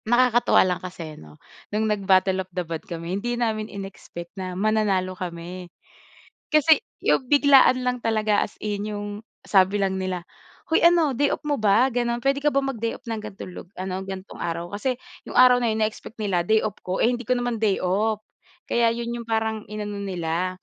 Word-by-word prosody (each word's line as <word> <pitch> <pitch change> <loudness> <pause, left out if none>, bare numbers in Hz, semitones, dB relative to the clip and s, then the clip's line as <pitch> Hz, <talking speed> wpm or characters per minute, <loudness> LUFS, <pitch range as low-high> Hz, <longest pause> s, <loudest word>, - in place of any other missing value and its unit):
Nakakatuwa 240 -1 +4
lang 180 -1 -1
kasi 175 -4 -7
no, 75 - -14 0.3
nung 215 +1 0
nag 210 -2 0
Battle 190 0 +4
of 185 - -10
the 180 - 0
Band 165 -1 -6
kami 170 0 -5
hindi 240 +1 -2
namin 220 -2 -1
inexpect 195 -3 -9
na 185 -2 -5
mananalo 200 -3 +1
kami. 180 0 -7 0.8
Kasi 305 +1 +5 0.2
yung 255 - +2
biglaan 280 -3 +6
lang 250 -1 -1
talaga 215 -2 +2
as - - -23
in 210 0 -3
yung 205 0 -4 0.4
sabi 195 0 +4
lang 190 -1 0
nila, 185 -2 -3 0.4
hoy 320 - +2
ano 335 -4 +5
day 285 +3 +2
off - - -3
mo 290 -5 -1
ba? 220 +5 +4
Ganun. 240 -1 0
Pwede 275 +1 +2
ka 295 - +3
ba 275 - -1
mag-day 255 -5 -1
off 255 - -32
ng 225 -2 -3
gantong 205 -3 -8
lug 175 - -10
ano 185 0 -3
gantong 190 0 -8
araw? 170 +2 -4
Kasi 245 +5 -1 0.3
yung - - -3
araw 250 0 +7
na 235 - +2
yun 220 - 0
na-expect 220 +1 -7
nila 195 -5 0
day 220 +5 +2
off 210 -1 -3
ko 185 +1 -3
eh, - - +3
hindi 240 - -3
ko 250 +1 0
naman 245 -2 -2
day 205 -3 +2
off. 210 +4 0 0.4
Kaya 235 -1 +2
yun 235 +1 -3
yung 230 - -12
parang 220 -1 0
inano 210 -1 -5
nila, 180 -1 -2
210 Hz, 200 wpm, -24 LUFS, 185-240 Hz, 0.8 s, araw